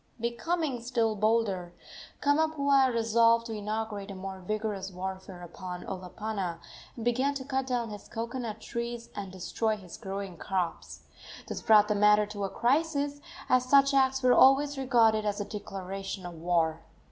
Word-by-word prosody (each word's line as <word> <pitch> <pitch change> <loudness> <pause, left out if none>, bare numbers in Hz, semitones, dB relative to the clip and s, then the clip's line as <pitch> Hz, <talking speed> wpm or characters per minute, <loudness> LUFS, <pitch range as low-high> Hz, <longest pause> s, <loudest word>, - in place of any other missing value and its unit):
Becoming 255 +3 -1
still 230 -2 0
bolder, 205 -5 0 0.5
Kamapuaa 285 -3 +3
resolved 230 0 +3
to 225 - -5
inaugurate 210 -1 -4
a 195 - -6
more 190 0 -6
vigorous 205 0 -3
warfare 190 0 -6
upon 180 +1 -7
Olopana, 190 -1 -4 0.4
and 230 - -6
began 260 +4 +1
to 265 -1 -5
cut 265 -1 -1
down 240 -3 -1
his 205 -1 -9
cocoanut 230 -1 -4
trees 235 +1 -5
and 195 -2 -5
destroy 215 +4 -1
his 185 -4 -11
growing 195 -3 -6
crops. 185 -1 -3 0.4
This - - -5
brought 210 -1 +6
the 210 - +2
matter 210 0 +5
to 205 -1 -4
a - - -3
crisis, 285 +3 0 0.3
as 255 0 +3
such 275 +1 +5
acts 265 -1 +3
were 250 -1 +6
always 280 +3 +5
regarded 235 -5 +3
as 205 -1 -1
a 205 - -2
declaration 195 -2 -6
of 175 - -6
war. 165 -1 0
220 Hz, 155 wpm, -29 LUFS, 195-255 Hz, 0.5 s, brought